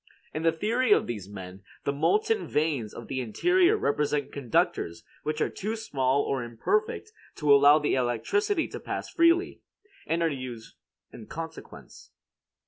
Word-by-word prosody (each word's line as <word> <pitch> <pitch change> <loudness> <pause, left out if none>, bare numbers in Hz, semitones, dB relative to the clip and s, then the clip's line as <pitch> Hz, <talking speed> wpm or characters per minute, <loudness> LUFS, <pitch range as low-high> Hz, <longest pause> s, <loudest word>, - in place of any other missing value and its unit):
In 155 - -3
the 165 0 +3
theory 220 +8 0
of - - +2
these 105 -5 -6
men, 95 -1 -9 0.2
the 140 - 0
molten 425 - +1
veins 145 -8 0
of 115 - -9
the 130 -1 -2
interior 355 - +3
represent 145 - 0
conductors 110 -10 -1 0.2
which 155 0 -3
are - - +2
too 215 +3 -4
small 140 - 0
or 135 -3 -2
imperfect 425 - -1 0.2
to 150 -2 +4
allow 140 +2 +7
the 150 -1 0
electricity 135 - 0
to - - -7
pass - - -5
freely, 335 +2 +3 0.5
and 170 +1 +1
are 165 - +2
fused 125 -4 -7 0.4
in 110 - -11
consequence. 160 0 -9
150 Hz, 150 wpm, -27 LUFS, -, 0.5 s, allow